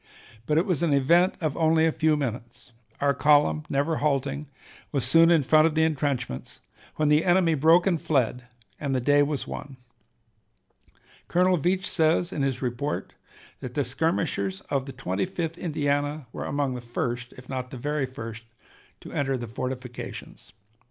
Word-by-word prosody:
But 150 Hz, -, +2 dB
it 165 Hz, -, +3 dB
was 180 Hz, -6 st, 0 dB
an 160 Hz, -4 st, +2 dB
event 170 Hz, +7 st, +4 dB
of 155 Hz, -4 st, -1 dB
only 160 Hz, 0 st, +3 dB
a 165 Hz, -, +3 dB
few 155 Hz, -1 st, +2 dB
minutes; 120 Hz, -3 st, -5 dB, 0.3 s
our 140 Hz, 0 st, +2 dB
column, 145 Hz, -, +3 dB
never 145 Hz, +3 st, 0 dB
halting, 140 Hz, 0 st, -1 dB, 0.4 s
was 135 Hz, -5 st, 0 dB
soon 165 Hz, +6 st, +6 dB
in 165 Hz, -4 st, +4 dB
front 155 Hz, +4 st, +5 dB
of 160 Hz, -, -3 dB
the 160 Hz, -, +3 dB
intrenchments, 140 Hz, -, -2 dB, 0.4 s
when 155 Hz, -1 st, +1 dB
the 150 Hz, +1 st, +4 dB
enemy 175 Hz, -2 st, +3 dB
broke 160 Hz, +4 st, +4 dB
and 175 Hz, -5 st, +1 dB
fled, 125 Hz, -4 st, 0 dB, 0.3 s
and 140 Hz, -3 st, -1 dB
the -, -, +2 dB
day 145 Hz, +3 st, +4 dB
was 145 Hz, -1 st, -1 dB
won. 135 Hz, -2 st, -8 dB, 1.5 s
Colonel 180 Hz, +1 st, +3 dB
Veatch 185 Hz, +4 st, 0 dB
says 170 Hz, 0 st, +1 dB
in 145 Hz, -, -2 dB
his 135 Hz, -1 st, -1 dB
report 125 Hz, +4 st, -3 dB, 0.5 s
that 125 Hz, -1 st, -7 dB
the 145 Hz, -, +1 dB
skirmishers 125 Hz, -, -1 dB
of 140 Hz, -1 st, 0 dB
the -, -, -5 dB
Twenty 95 Hz, -, -2 dB
fifth 170 Hz, -3 st, -4 dB
Indiana 145 Hz, -2 st, -1 dB
were -, -, -5 dB
among 140 Hz, -2 st, -1 dB
the 125 Hz, -, -6 dB
first, 120 Hz, 0 st, -4 dB
if 125 Hz, 0 st, -12 dB
not 130 Hz, -1 st, -4 dB
the 130 Hz, -, -8 dB
very 145 Hz, +2 st, -1 dB
first, 115 Hz, -3 st, -8 dB, 0.6 s
to -, -, -10 dB
enter 135 Hz, -2 st, -1 dB
the 120 Hz, -, -5 dB
fortifications. 125 Hz, -4 st, -7 dB
145 Hz, 170 wpm, -26 LUFS, 130-160 Hz, 1.5 s, soon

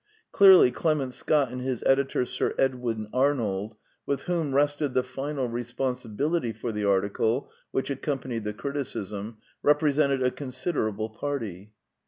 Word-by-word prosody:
Clearly 190 Hz, -9 st, +8 dB
Clement 145 Hz, -5 st, 0 dB
Scott 145 Hz, -3 st, +1 dB
and 125 Hz, 0 st, -5 dB
his 130 Hz, -2 st, -2 dB
editor 135 Hz, -1 st, +2 dB
Sir 125 Hz, +1 st, -1 dB
Edwin 125 Hz, -5 st, 0 dB
Arnold, 115 Hz, -6 st, 0 dB, 0.3 s
with 140 Hz, -1 st, -2 dB
whom 165 Hz, -6 st, -1 dB
rested 145 Hz, -1 st, +1 dB
the 130 Hz, -, +3 dB
final 135 Hz, +1 st, -3 dB
responsibility 125 Hz, +3 st, -2 dB
for 115 Hz, +2 st, -4 dB
the 105 Hz, -1 st, -3 dB
article 100 Hz, +5 st, +1 dB, 0.2 s
which 135 Hz, -, -2 dB
accom 140 Hz, +1 st, -2 dB
panied 120 Hz, -4 st, -4 dB
the 105 Hz, 0 st, -3 dB
criticism, 110 Hz, -5 st, -5 dB, 0.2 s
represented 145 Hz, -2 st, +3 dB
a 125 Hz, -, +2 dB
considerable 125 Hz, -, -3 dB
party. 110 Hz, -7 st, -5 dB
130 Hz, 135 wpm, -27 LUFS, 110-140 Hz, 0.3 s, Clearly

